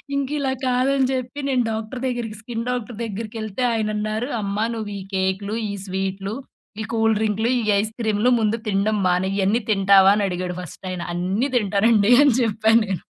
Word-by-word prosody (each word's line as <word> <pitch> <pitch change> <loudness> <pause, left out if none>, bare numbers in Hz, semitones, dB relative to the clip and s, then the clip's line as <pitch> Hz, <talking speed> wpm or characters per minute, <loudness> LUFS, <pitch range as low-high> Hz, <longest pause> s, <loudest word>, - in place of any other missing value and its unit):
ఇంకిలా 280 0 -1
కాదని 260 +1 +2
చెప్పి, 255 +2 -4
నేను 255 -2 +2
డాక్టర్ 220 +3 -5
దగ్గరికి 235 -4 -4
స్కిన్ 230 +1 -5
డాక్టర్ 245 -3 -3
దగ్గరికెళ్తే 220 +1 -4
ఆయనన్నారు. 215 +2 -2
"అమ్మా 200 +2 -1
నువ్వు 215 -2 -5
ఈ - - -7
కేకులు, 190 +3 -1 0.2
ఈ - - -4
స్వీటులు. 195 +2 -3 0.5
ఈ - - -2
కూల్ 225 0 +3
డ్రింకులు, 220 +2 0
ఈ - - -4 0.2
ఐస్ 215 +1 -1
క్రీములు 220 +2 +2
ముందు 220 +1 0
తిడం 205 +1 +1
మానేయి. 185 +2 +1
ఇయన్నీ 205 +5 +2
తింటావా?" 195 -1 +6
అని 205 - +1
అడిగాడు 180 0 -4
ఫస్ట్ 180 +2 -10
ఆయన 180 - -4
"అన్నీ 190 +10 -1
దింటానండి" 210 +1 +3
అని 280 -5 +5
జెప్పాను 220 +1 +3
నేను. 190 -4 -3
215 Hz, 165 wpm, -22 LUFS, 195-235 Hz, 0.5 s, తింటావా